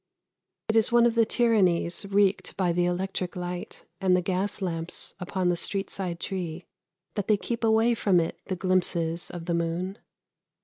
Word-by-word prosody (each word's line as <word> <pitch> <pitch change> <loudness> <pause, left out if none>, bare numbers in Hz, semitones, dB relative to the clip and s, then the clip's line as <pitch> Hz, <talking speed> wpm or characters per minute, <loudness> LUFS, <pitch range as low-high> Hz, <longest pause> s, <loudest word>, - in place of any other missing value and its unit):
It 220 - 0
is 225 0 +5
one 235 0 +6
of 235 - +3
the 230 -1 +3
tyrannies 200 -7 +2
wreaked 200 0 +1
by 180 -3 +1
the 175 +1 +2
electric 180 0 -2
light 180 0 -6
and 185 -2 +3
the - - +1
gas 195 +2 -1
lamps 165 -3 -4
upon 185 0 -1
the 175 - +2
street 195 +3 -2
side 180 -3 -4
tree 175 -2 -4 0.5
that 205 -3 -3
they 215 - +4
keep 230 +3 -4
away 225 +1 +4
from 200 -5 +3
it 165 - -2
the 185 - -2
glimpses 175 -2 0
of 170 -2 -7
the 170 - -1
moon. 170 +4 -2
185 Hz, 175 wpm, -27 LUFS, 175-205 Hz, 0.5 s, one